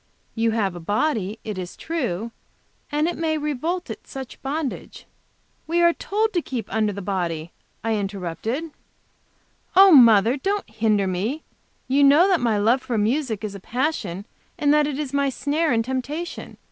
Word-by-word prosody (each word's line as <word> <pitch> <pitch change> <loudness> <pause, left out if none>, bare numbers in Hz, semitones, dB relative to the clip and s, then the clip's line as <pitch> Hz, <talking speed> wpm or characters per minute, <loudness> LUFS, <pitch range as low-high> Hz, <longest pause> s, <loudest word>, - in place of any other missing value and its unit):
You 225 0 +1
have 205 -5 0
a - - -6
body, 210 - -1
it 210 -4 -5
is 180 -1 -7
true, 235 - -3 0.6
and 300 +2 +1
it 345 - -3
may 320 -1 0
revolt 305 +4 -2
at - - -9
such 265 -2 -8
bondage 280 0 -4 0.3
" - - -41
"We 340 +2 +1
are 340 0 +5
told 435 +5 -1
to 350 - +1
keep 245 -8 -5
under 215 -1 +1
the 200 -1 -6
body," 170 -4 -2 0.3
I 225 0 0
interrupted. 205 - -4 1.0
"Oh, 390 0 +8
mother, 235 - +7
don't 400 +7 -2
hinder 215 -2 +1
me! 205 - -2 0.4
You 275 +2 +3
know 335 +8 +6
my 230 -3 +1
love 230 +6 +3
for 245 -3 -2
music 225 0 0
is 210 -2 -4
a 200 - -8
passion 210 - -2 0.3
and 290 0 +3
that 300 -1 +3
it 285 -2 -3
is 290 -3 -4
my 280 -1 +2
snare 295 +5 0
and 225 -1 +1
temptation. 280 +7 -4
250 Hz, 170 wpm, -23 LUFS, 210-300 Hz, 1.0 s, Oh